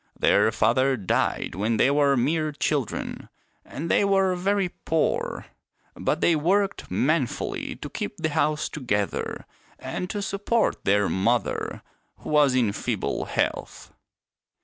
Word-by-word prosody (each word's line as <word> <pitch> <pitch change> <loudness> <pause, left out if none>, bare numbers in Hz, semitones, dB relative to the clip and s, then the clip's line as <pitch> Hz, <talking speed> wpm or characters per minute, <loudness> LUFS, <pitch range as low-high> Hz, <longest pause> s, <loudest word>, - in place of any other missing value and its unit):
Their 110 - +4
father 130 +5 +2
died 95 -5 -1
when 110 +5 0
they 130 - +4
were 140 -1 +3
mere 155 +5 +1
children, 140 -3 -2 0.3
and 155 +4 -6
they 170 - +3
were 195 -1 +3
very 195 +1 0
poor. 160 -2 -1 0.5
But 155 - -1
they 170 - +4
worked 190 +6 0
manfully 150 -2 -1
to - - -7
keep - - -5
the 160 -3 -1
house 150 0 0
to 150 - -7
gether 105 -5 -2 0.3
and 180 - -5
to 205 -1 -3
support 205 +4 0
their 100 +1 +3
mother, 115 +6 -1 0.3
who - - -8
was 145 -3 +4
in 120 -5 +2
feeble - - -2
health. - - -3
150 Hz, 135 wpm, -25 LUFS, 120-180 Hz, 0.5 s, Their